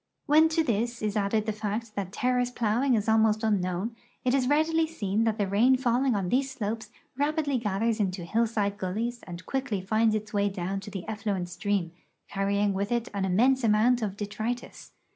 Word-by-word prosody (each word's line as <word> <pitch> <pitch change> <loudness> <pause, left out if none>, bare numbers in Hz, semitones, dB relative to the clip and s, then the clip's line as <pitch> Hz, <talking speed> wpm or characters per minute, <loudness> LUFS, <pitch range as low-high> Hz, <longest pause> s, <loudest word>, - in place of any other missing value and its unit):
\Mien 315 +2 +6
to 325 0 +2
this 235 -2 -1
is 210 0 -1
added 210 +1 +1
the 220 - 0
fact 215 +1 -4
that 195 -3 -4
ter 250 +4 0
race 245 0 +1
plowing 240 +2 +1
is 210 -1 -1
almost 220 0 +3
unknown, 200 +1 0 0.3
it 250 - +2
is 265 -2 +2
readily 320 +2 +2
seen 220 -8 -1
that 220 -1 0
the 205 - +1
rain 225 +7 +4
falling 250 0 +1
on 190 -3 -1
these 270 +4 +1
slopes 220 -3 -4 0.3
rapidly 290 -1 0
gathers 220 +1 0
into 185 -3 -1
hillside 215 0 0
gullies 225 +6 -3
and 175 0 -8
quickly 265 -7 -2
finds 215 +3 +2
its 215 0 -4
way 205 0 +2
down 195 0 -3
to 195 - -9
the 195 -3 -7
effluent 205 -5 -2
stream, 195 -2 -1 0.4
carrying 200 +1 0
with 200 +3 -2
it 235 0 0
an 200 -1 -1
immense 245 +8 +3
amount 230 +3 +3
of 205 -2 -3
detritus. 215 +4 -5
215 Hz, 190 wpm, -27 LUFS, 200-245 Hz, 0.4 s, Mien